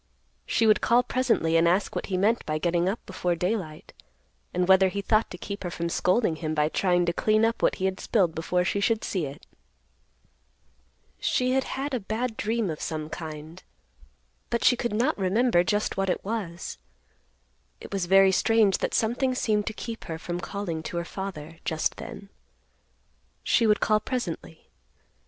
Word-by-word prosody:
She 225 - +2
would 215 -1 +4
call 240 +2 +4
presently 235 -11 +1
and 165 +1 +4
ask 185 +4 +1
what - - -3
he 185 - -1
meant 215 +5 +2
by 155 0 0
getting 175 +2 +1
up 210 - -4
before 180 -2 -1
daylight, 180 -3 -3 0.6
and 180 0 0
whether 190 0 +6
he 200 +2 -3
thought 215 +2 +2
to 180 - -8
keep 200 +2 -6
her 175 - -2
from 170 0 -3
scolding 180 -1 +1
him 155 0 -3
by 150 0 +2
trying 180 0 +2
to 170 - 0
clean 215 +4 +3
up 230 +1 -1
what - - +3
he 190 - -2
had 190 0 -1
spilled 185 -7 +1
before 180 +3 0
she 200 - 0
should 225 +2 +1
see 175 -7 -2
it. 140 +5 -11 1.7
She 255 0 +1
had 265 0 +1
had 275 +1 -3
a 255 - 0
bad 220 +3 -3
dream 220 -3 -1
of 155 - -7
some 155 -1 -4
kind, 160 +1 -7 0.9
but 235 - -1
she 250 - +6
could 235 -2 -2
not 250 +8 +2
remember 195 0 +3
just 205 +3 -1
what 195 0 0
it 180 - -2
was. 190 - -4 1.0
It - - -10
was 190 -3 -1
very 195 +1 +6
strange 215 0 +3
that - - -1
something 250 +3 +1
seemed 210 -4 0
to - - 0
keep 230 +1 -7
her 160 - -4
from 175 +1 -4
calling 180 -4 -4
to 170 - -5
her 170 - -2
father 165 -5 -7
just 160 -1 -1
then. 200 - -9 1.1
She 230 - +3
would 210 0 +3
call 215 -1 +3
presently. 190 -9 -5
190 Hz, 185 wpm, -26 LUFS, 170-225 Hz, 1.7 s, whether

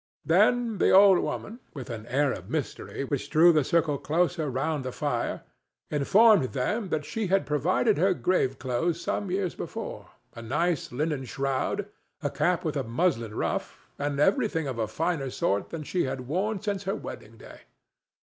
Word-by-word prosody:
Then 215 +5 +3
the - - +4
old 195 -1 +7
woman, 230 +3 -4 0.2
with 130 -4 -6
an 115 -1 -7
air 135 +2 +2
of - - -9
mystery - - -4
which - - -3
drew 170 +2 +6
the 155 -2 +3
circle 155 -1 +1
closer 165 -1 0
round 140 +3 -1
the 130 - -4
fire, - - -2 0.5
informed 185 - +4
them 190 - -1
that 150 -3 -1
she 220 +3 -3
had 195 +2 +2
provided 145 -1 +1
her 185 +1 +3
grave 135 -9 +1
clothes 150 +7 -1
some 200 +2 -2
years 185 -1 -1
before—a 115 - -8
nice 150 +7 -1
linen 145 +1 -2
shroud, 135 +10 -1 0.4
a 145 - -1
cap 170 +3 0
with 155 -2 -1
a 135 - 0
muslin 115 -4 0
ruff, - - -2 0.2
and 145 -1 -2
everything 190 - +2
of 130 -3 -4
a 110 - 0
finer 150 +3 -1
sort 100 -4 -1
than 160 -2 -5
she 180 +4 -1
had 130 0 -3
worn 190 - -1
since 200 -2 -3
her 195 - -1
wedding 115 +2 -9
day. - - -13
155 Hz, 170 wpm, -27 LUFS, 135-185 Hz, 0.5 s, old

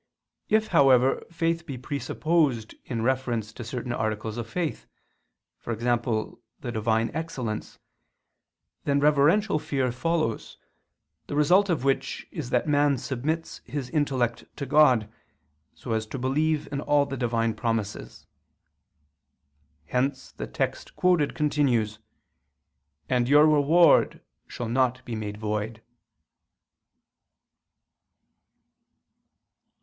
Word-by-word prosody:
If, 220 0 +2
however, 135 -1 +4
faith 165 0 -1
be 135 -4 -5
presupposed 140 -2 0
in 115 -3 -3
reference 120 -4 -1
to 120 - -8
certain 120 +1 -4
articles 110 -1 -2
of 115 -1 -5
faith, 170 +3 -3 0.7
for - - -6
example 120 -1 -1 0.2
the 120 - -5
Divine 110 0 0
excellence, 130 -10 -4 1.1
then 140 0 +1
reverential 150 +6 +3
fear 135 -4 -1
follows, 130 -2 -2 0.7
the - - -4
result 180 +7 +4
of 155 -8 0
which 135 0 -1
is 120 - -5
that 125 +2 +1
man 145 -1 +3
submits 145 +7 -3
his 130 -1 -5
intellect 130 -6 0
to 140 - -4
God, 130 -6 +4 0.7
so 120 - -7
as 110 -1 -1
to 120 - -6
believe 150 +4 0
in 140 -1 -2
all 145 -1 +3
the 140 -1 -5
Divine 115 -2 0
promises. 115 -4 -3 1.6
Hence 130 +1 -1
the - - -6
text - - -3
quoted 175 -5 +2
continues: 125 -8 +1 1.1
"And 125 -1 +1
your 145 +2 +7
reward 155 +3 +4 0.3
shall 120 - -5
not 125 +1 0
be 120 - -6
made 105 -1 -5
void." 110 +1 -3
130 Hz, 110 wpm, -26 LUFS, 115-150 Hz, 1.6 s, your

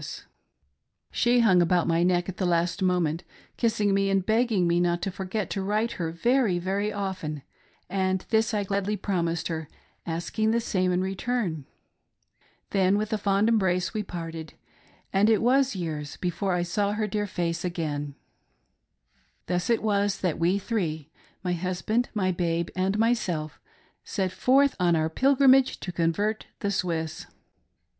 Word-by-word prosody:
tI2 - - -8
"WE - - -6
THREE - - -6
SET - - -13 0.9
FORTH.' - - -10
She 240 +1 +4
hung 185 -6 +5
about 175 0 +2
my 165 0 +2
neck 175 0 +2
at 190 - -6
the 190 - -1
last 170 +1 +1
moment, 180 -3 +1 0.3
kissing 215 -4 +1
me 195 0 +2
and 195 -1 +1
begging 220 -4 +2
me 170 0 +2
not 175 0 +1
to 195 - -1
forget 190 +3 -4
to 195 - -2
write 215 +4 0
to - - -7
her 165 -3 -2
very, 230 +2 +2
very 195 +4 -1
often, 185 -8 -4 0.4
and 190 0 -1
this 220 0 +3
I 210 -2 0
gladly 200 +1 -1
promised 170 -4 -1
her, 160 -2 -4 0.4
asking 175 +6 -1
the 230 +1 +2
same 185 -5 0
in 180 0 +1
return. 190 - -2 1.0
Then 195 0 +3
with 215 +1 -2
a 215 - 0
fond 200 +1 +2
embrace 190 -5 +1
we 215 - -1
parted, 165 -4 -7 0.6
and 200 +3 +4
it 220 -2 +4
was 260 +1 +3
years 155 -5 -4
before 180 +2 -1
I 175 0 +1
saw 200 +3 0
her 215 0 -1
dear 210 0 -2
face 170 -3 -2
again. 150 -5 -3 1.3
Thus 180 +3 -1
it 230 -2 +2
was 205 -2 +1
that 180 -5 -1
we 175 +4 +2
three 160 -8 -3 0.2
— - - -35
my 180 -1 0
husband, 185 +7 -1
my 185 -3 +1
babe, 170 -1 -1
and 190 +2 0
myself 185 -9 0 0.2
— - - -33 0.2
set 190 -3 -2
forth 275 +5 +3
on 175 -2 +3
our 160 0 0
pilgrimage 270 +3 +4
to 180 - -4
convert 180 +6 -1
the 200 -2 0
Swiss. 165 -4 -2
190 Hz, 175 wpm, -26 LUFS, 170-210 Hz, 1.3 s, hung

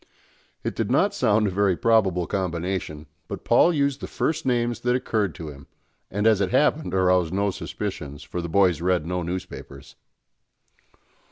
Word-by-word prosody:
It - - -3
did - - -1
not - - +3
sound 105 0 +2
a 100 - 0
very 95 -1 +2
probable 95 -6 +2
combination; 90 -4 -3 0.2
but - - -6
Paul 175 - +5
used 140 -4 0
the - - -5
first 160 -2 -2
names 120 -2 +1
that 125 0 +1
occurred 105 -7 -1
to 80 -4 -7
him, 70 -1 -12 0.4
and, 105 +2 -2
as 110 -3 +4
it 95 - +1
happened, 150 0 +1
aroused 90 -3 +3
no 100 0 +1
suspicions, 75 -4 -6
for 90 - -5
the 85 - -5
boys 90 -3 +3
read 90 -2 +1
no 90 +1 -2
newspapers. 85 -6 -7
95 Hz, 165 wpm, -24 LUFS, 85-110 Hz, 0.4 s, Paul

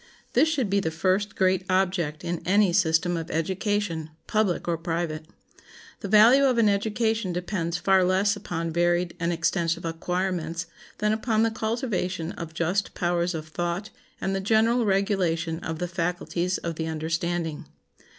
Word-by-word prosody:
This 315 - +4
should 275 -8 0
be 200 +1 +2
the 165 - -1
first 185 +5 0
great 185 -1 +2
object 180 -5 0
in 175 -1 -3
any 195 -1 +3
system 175 -1 +2
of 165 0 -4
education, 180 -1 -1 0.2
public 215 -6 0
or 170 - +1
private. 165 -2 -3 0.7
The - - -5
value 225 +7 +7
of 255 -3 +2
an 230 -2 +4
education 220 0 0
depends 175 -1 -2
far 190 +1 +3
less 190 +3 +2
upon 165 -4 -4
varied 175 +1 +1
and 170 0 0
extensive 170 0 0
acquirements 170 0 -2 0.3
than 210 0 +1
upon 220 0 +1
the 225 - +2
cultivation 215 -7 -2
of 165 -1 -8
just 180 +5 -1
powers 175 0 0
of 160 0 -6
thought 175 +5 -3 0.3
and 190 0 -1
the - - 0
general 225 +4 +3
regulation 180 -5 0
of 160 -2 -4
the 180 - -2
faculties 175 +1 -1
of 165 -1 -5
the 160 - -2
understanding. 160 0 -2
180 Hz, 155 wpm, -26 LUFS, 165-205 Hz, 0.7 s, value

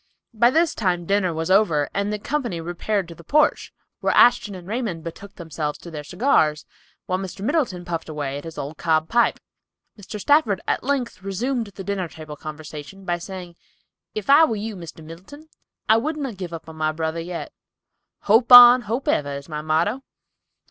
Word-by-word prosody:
By 235 +2 +4
this 325 +4 +2
time 180 -5 -1
dinner 195 -1 +1
was 160 +2 -3
over 170 -8 +3
and 200 +1 -1
the 210 - -2
company 240 - -3
repaired 175 +3 -2
to - - -8
the 170 - -15
porch, 300 - +2 0.3
where - - 0
Ashton 235 -4 +4
and 180 -1 -11
Raymond 210 -7 -3
betook 195 +4 -9
themselves 155 -3 -4
to 170 - -11
their 150 -2 -6
cigars, 155 - +1 0.4
while 185 0 -1
Mr. 195 +1 -6
Middleton 240 - -1
puffed 165 -2 -4
away 145 -2 -4
at - - -12
his 165 -1 -9
old 145 +2 -6
cob 160 -1 +1
pipe. 235 0 +2 0.6
Mr. 205 +1 -8
Stafford 235 -5 +3
at - - 0
length 250 -7 -2
resumed 225 +5 -2
the 200 -1 -9
dinner 195 -2 -2
table 155 -2 -10
conversation 155 +5 -9
by 175 -1 -1
saying, 180 -1 -8 0.6
"If 215 -2 -4
I 285 +3 +7
were 270 -8 +2
you, 215 +1 -5
Mr. 165 -3 -10
Middleton, 195 - -12 0.4
I 220 - +5
would 305 +7 -2
not 270 -8 -5
give 180 -3 -6
up 165 -1 -7
my 155 -1 -2
brother 160 +1 -3
yet; 170 +1 -6 0.7
'Hope 225 +4 +3
on, 245 0 +11
hope 235 +4 -4
ever,' 145 -1 0
is 140 - -11
my 150 -1 -5
motto." 165 - 0
185 Hz, 185 wpm, -22 LUFS, 160-225 Hz, 0.7 s, on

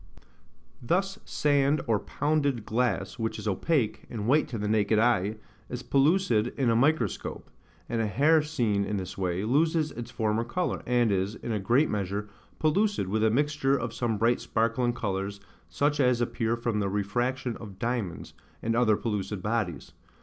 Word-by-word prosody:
Thus, 195 - 0
sand 145 0 +2
or 110 -3 +2
pounded 145 -6 0
glass, 120 +2 -1
which 115 0 -2
is - - -6
opaque, 115 - 0
and 110 -3 -4
white 150 +5 +3
to 115 - -5
the 105 0 -2
naked 110 0 +2
eye, 110 -3 +2 0.3
is 125 0 -5
pellucid 140 - +2
in 130 -4 +2
a - - +2
microscope; 130 - 0 0.4
and 115 0 -1
a 110 - 0
hair 150 - +4
seen 120 -10 0
in 105 +1 -2
this 95 -1 -5
way, 90 0 -1
loses 155 +6 +2
its 120 -1 -7
former 110 -1 0
colour, 175 +10 -2
and 120 -3 +3
is, 100 +2 0
in 120 - -6
a 105 - 0
great 120 +10 +3
measure, 100 0 -2 0.3
pellucid, 175 - +1
with 110 +2 0
a 110 - +5
mixture 140 +2 +1
of 115 -2 -4
some 115 -2 -1
bright 115 +3 +2
sparkling 115 +2 0
colours, 100 -3 -3 0.3
such 145 - 0
as 125 -3 +3
appear 120 -1 0
from 115 -2 -1
the 100 -1 0
refraction 120 +5 -1
of 100 -4 -10
diamonds, 115 -5 -3 0.3
and 115 0 0
other 115 -3 +3
pellucid 105 -3 -3
bodies. 105 -10 -2
115 Hz, 170 wpm, -28 LUFS, 105-135 Hz, 0.4 s, a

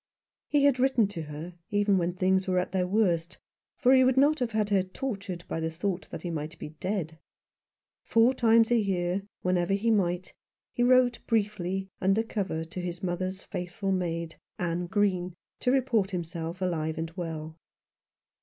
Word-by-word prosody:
He 290 -1 +2
had 280 -3 +4
written 250 -5 +3
to 170 -5 -5
her 155 +3 -7 0.2
even 205 -2 +3
when 175 0 0
things 190 +1 +2
were 185 -1 +1
at 180 - 0
their 180 -1 0
worst; 180 -4 +1 0.4
for 255 - +5
he 260 -1 +7
would 260 0 +3
not 290 +3 +4
have 240 -3 -1
her 205 -3 +2
tortured 195 -3 -5
by - - -3
the 160 0 -1
thought 180 +3 -3
that - - -7
he 175 - -3
might 155 0 -5
be - - -7
dead. 180 -5 -3 0.8
Four 230 +3 +4
times 230 -2 +4
a 240 - +5
year 185 -2 0
— - - -65
wherever 180 +1 +2
he 225 +3 +1
might 180 -4 +1
be - - -16 0.3
— - - -66
he - - -2
wrote 245 -1 +4
briefly, 195 -4 0
under 195 +4 +3
cover 195 -7 -2
to 170 +3 -6
his 175 +1 -5
mother's 185 +1 -2
faithful 180 +2 -4
maid, 170 -3 -2 0.2
Anne 175 0 -2
Green, 185 -2 0 0.2
to 250 - +1
report 235 -8 +1
him 175 - -1
self 165 +2 -5
alive 160 -3 -1
and 165 0 -3
well. 160 -2 -5
185 Hz, 180 wpm, -28 LUFS, 175-220 Hz, 0.8 s, he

